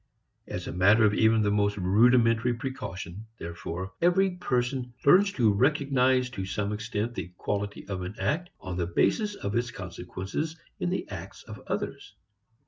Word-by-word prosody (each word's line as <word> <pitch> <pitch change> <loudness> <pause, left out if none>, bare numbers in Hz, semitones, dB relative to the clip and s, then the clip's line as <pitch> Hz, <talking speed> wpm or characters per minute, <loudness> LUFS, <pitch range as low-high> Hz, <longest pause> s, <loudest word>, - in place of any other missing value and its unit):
As 90 0 -5
a - - -4
matter 100 +5 +5
of 105 - +3
even 110 0 +4
the 105 - +2
most 105 0 +1
rudimentary 115 +4 +4
precaution, 110 -6 -6
therefore, 85 +2 -6
every 185 +3 +4
person 125 -6 -2
learns 195 +7 +6
to 110 -5 +3
recognize 130 0 +3
to 95 -6 -4
some 100 +2 -2
extent 110 +1 -3
the 90 -5 -5
quality 100 0 -3
of 95 -2 -4
an 90 +4 -5
act 175 +5 -1
on 90 -1 -5
the 85 -2 0
basis 205 - +1
of 100 - -4
its 120 +1 0
consequences 95 - -5 0.2
in - - 0
the 185 - -2
acts 95 -1 -8
of - - -10
others. - - -4
110 Hz, 160 wpm, -28 LUFS, 95-130 Hz, 0.2 s, learns